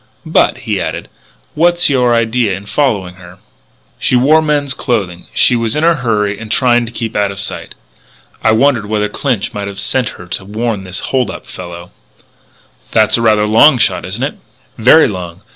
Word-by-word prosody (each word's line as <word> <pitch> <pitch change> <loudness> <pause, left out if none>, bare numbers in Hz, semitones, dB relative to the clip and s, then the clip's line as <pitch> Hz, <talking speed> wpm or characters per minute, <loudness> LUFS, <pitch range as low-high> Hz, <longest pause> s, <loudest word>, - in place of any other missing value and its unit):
"But," - - +1
he - - -1
added, - - -5 0.4
"what's 175 +2 +2
your 125 -4 +2
idea 115 -3 0
in 100 - -12
following 100 -8 -1
her?" 90 0 -14 0.6
"She - - +1
wore 145 +6 +4
men's 145 -3 0
clothes; 95 -8 -3
she 125 - +4
was 115 -1 0
in 150 - 0
a 170 +1 +5
hurry 105 -7 -1
and 110 -1 -8
trying 120 -2 +2
to - - -7
keep 115 -1 -5
out 105 -1 +1
of 100 0 -7
sight. 100 - -6 0.7
I - - +3
wondered 115 -1 +2
whether 105 0 0
Clinch 120 -3 -2
might 100 -1 -4
have 100 -1 -7
sent 125 -4 0
her 90 - -11
to 90 - -5
warn 105 0 -3
this 90 0 -6
hold 130 -5 +1
up - - -8
fellow." 85 0 -10 1.0
"That's 110 +1 +3
rather 110 -2 +3
a - - 0
long 125 +6 +6
shot, - - +1
isn't 100 +7 -4
it?" 140 - -4 0.4
"Very 130 +8 +5
long. 90 -1 -7
110 Hz, 185 wpm, -14 LUFS, 100-125 Hz, 1.0 s, long